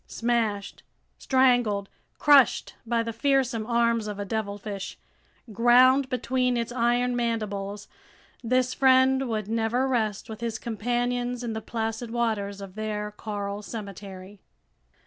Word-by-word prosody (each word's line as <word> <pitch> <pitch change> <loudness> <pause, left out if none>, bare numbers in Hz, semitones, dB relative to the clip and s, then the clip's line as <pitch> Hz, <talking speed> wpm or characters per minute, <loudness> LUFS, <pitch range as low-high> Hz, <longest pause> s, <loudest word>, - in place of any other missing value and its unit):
Smashed, 225 -4 -1 0.4
strangled, 245 -6 +2 0.3
crushed 285 -3 +4
by 230 0 +1
the 230 0 -4
fearsome 255 -3 +1
arms 235 -2 +1
of 210 -1 -5
a 205 - -4
devilfish, 205 -1 -4 0.6
ground 255 +4 +5
between 250 -1 0
its 235 0 -2
iron 245 +1 +1
mandibles, 210 -4 -3 0.6
this 255 +2 +1
friend 265 0 +4
would 215 -3 -2
never 230 +4 0
rest 220 -6 -1
with 220 0 -8
his 230 -2 -2
companions 245 +2 -2
in 230 -2 -3
the 220 - -4
placid 225 +1 -4
waters 215 -4 -2
of 195 -2 -9
their 210 0 -4
coral 205 -1 -5
cemetery! 200 -2 -9
230 Hz, 125 wpm, -26 LUFS, 210-245 Hz, 0.6 s, ground